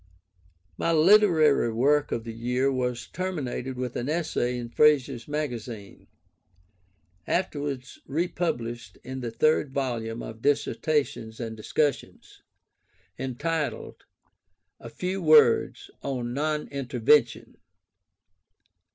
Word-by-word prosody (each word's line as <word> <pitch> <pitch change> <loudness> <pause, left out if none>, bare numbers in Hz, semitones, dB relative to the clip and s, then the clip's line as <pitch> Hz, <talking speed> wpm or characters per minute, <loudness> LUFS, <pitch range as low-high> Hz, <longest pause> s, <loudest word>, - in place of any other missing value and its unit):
My 165 - +1
literary 160 - +5
work 145 +6 +2
of 115 - -2
the 115 -1 -7
year 125 +4 0
was 125 -2 -2
terminated 140 -8 -4
with 125 -1 -4
an 125 +3 -3
essay 150 -6 -1
in 120 -1 -6
Fraser's 135 -3 +3
Magazine 120 -8 -5 1.2
(afterwards 145 -7 -2
republished 120 - -3
in 130 +1 -6
the 120 -2 -4
third 150 +5 +2
volume 120 -4 -3
of 110 0 -9
Dissertations 140 -4 0
and 115 -2 -5
Discussions), 140 +6 -2 0.8
entitled 145 +4 -3 0.8
"A 115 - -9
Few 185 +9 -3
Words 155 -7 +4
on 125 -3 -3
Non 150 +2 -1
Intervention." 130 -1 +1
130 Hz, 100 wpm, -26 LUFS, 120-150 Hz, 1.2 s, literary